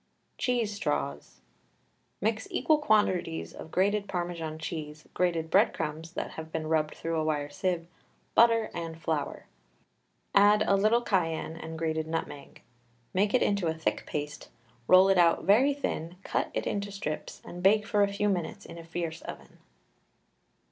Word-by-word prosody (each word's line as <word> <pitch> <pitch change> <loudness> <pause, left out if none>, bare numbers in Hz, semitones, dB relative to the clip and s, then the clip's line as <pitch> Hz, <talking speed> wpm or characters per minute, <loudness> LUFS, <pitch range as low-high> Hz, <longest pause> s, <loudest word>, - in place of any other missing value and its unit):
CHEESE 240 -4 0
STRAWS. 70 - -3 0.8
Mix 220 +2 0
equal 310 -1 +2
quantities 190 - +1
of - - -9
grated 200 +4 +1
Parmesan 175 -3 -3
cheese, 155 -1 -6
grated 170 -3 0
bread - - +4
crumbs 160 +1 -4
that - - -4
have 160 0 -8
been 160 -1 -3
rubbed 155 -1 0
through 165 0 -3
a - - 0
wire 145 -2 -1
sieve, 175 +1 -1 0.5
butter, 230 -1 +4
and 165 -1 -5
flour; 155 -3 -2 0.9
add 205 +1 +6
a 200 - +3
little 215 +4 +3
cayenne 165 -6 0
and 160 0 -7
grated 160 -1 -1
nutmeg. 160 -3 -5 0.5
Make 200 +5 +2
it 255 - +4
into 200 -4 +1
a 160 - 0
thick 160 - -2
paste, 150 0 -5 0.4
roll 185 +1 +7
it 195 -2 +4
out 170 -1 +4
very 255 +8 +4
thin, 175 - -3
cut - - -1
it - - -1
into 200 0 -2
strips, 155 -6 -5
and 175 - -8
bake 210 +3 +4
for 210 -2 +1
a 200 0 +3
few 205 +1 0
minutes 195 +1 -2
in 170 - -9
a - - -9
fierce 165 0 -4
oven. - - -10
175 Hz, 160 wpm, -29 LUFS, 160-205 Hz, 0.9 s, roll